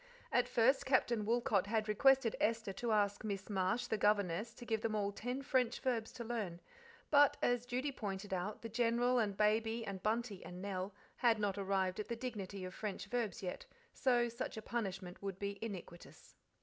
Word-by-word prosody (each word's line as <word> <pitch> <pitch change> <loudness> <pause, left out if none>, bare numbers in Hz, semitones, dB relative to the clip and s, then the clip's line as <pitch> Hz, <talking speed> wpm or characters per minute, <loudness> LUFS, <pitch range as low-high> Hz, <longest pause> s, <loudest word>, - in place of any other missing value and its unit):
At 245 0 +3
first 250 +2 +3
Captain 240 -5 +2
Woolcot 225 -4 +2
had 220 0 0
requested 260 +2 +4
Esther 225 -3 +1
to 230 +4 -2
ask 205 -1 +2
Miss 200 -1 -4
Marsh, 190 +4 +1
the 220 - -1
governess, 205 +1 +2
to 240 - -10
give 220 -2 0
them 220 -1 -1
all 200 -1 0
ten 250 +6 -4
French 250 -3 +1
verbs 240 -4 -1
to 245 - -6
learn; 215 -7 -3 0.5
but, 290 -1 +6
as 245 0 +2
Judy 255 +4 -1
pointed 200 -5 -4
out, 190 +5 -3
the - - -3
General 240 +2 +2
and 205 -4 0
Baby 225 +2 +2
and 195 -2 -5
Bunty 215 -2 -1
and 180 0 -8
Nell 190 0 -3 0.3
had 235 -3 +4
not 205 -2 0
arrived 190 -1 0
at 210 - -3
the 235 - -2
dignity 205 -6 -5
of 185 - -6
French 210 -2 -4
verbs 230 -3 -2
yet, 180 - -5 0.3
so 245 -2 +3
such 235 -1 -5
a - - -4
punishment 190 -7 -4
would 195 -2 -4
be 200 0 -4
iniquitous. 185 -5 -8
215 Hz, 190 wpm, -36 LUFS, 195-240 Hz, 0.5 s, but